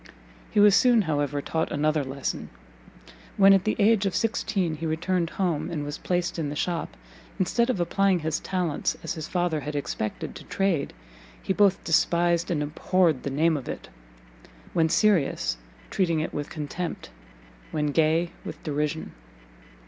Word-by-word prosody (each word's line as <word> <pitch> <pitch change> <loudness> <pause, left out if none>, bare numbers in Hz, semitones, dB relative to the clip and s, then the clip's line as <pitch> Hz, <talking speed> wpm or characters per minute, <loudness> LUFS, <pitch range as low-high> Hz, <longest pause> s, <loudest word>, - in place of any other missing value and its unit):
He 210 - +1
was 205 -1 +7
soon, 245 -4 +5
however, 145 -3 -1
taught 160 0 -1
another 150 0 +1
lesson; 135 +1 -4 0.9
when, 195 0 +7
at 195 -1 +3
the 215 - +1
age 210 -2 +4
of 185 - -2
sixteen, 200 -7 0
he 165 +1 -3
returned 170 +2 0
home, 175 -6 -1
and 155 -3 -3
was 145 +1 -5
placed 175 -1 -1
in 150 -3 -1
the 145 - -5
shop, 170 +2 -2 0.4
instead 235 +6 +1
of 250 - 0
applying 195 +2 +2
his 160 -1 -1
talents, 180 -5 -1
as - - -2
his 160 -3 -6
father 175 -3 0
had 145 +1 -5
expected, 110 -6 -3
to - - -10
trade, 190 -7 0 0.5
he - - 0
both 200 -1 +3
despised 170 +1 +2
and 155 -4 0
abhorred 160 0 +1
the - - -3
name 160 +4 +2
of 135 -4 -5
it; - - -6 0.8
when 160 -1 +3
serious, 175 - +2 0.3
treating 170 -4 +1
it 155 - -3
with 145 0 -4
contempt, 155 - -5 0.6
when 150 -1 -1
gay, 160 +3 +2
with - - -8
derision. 150 +1 -2
165 Hz, 160 wpm, -26 LUFS, 150-185 Hz, 0.9 s, was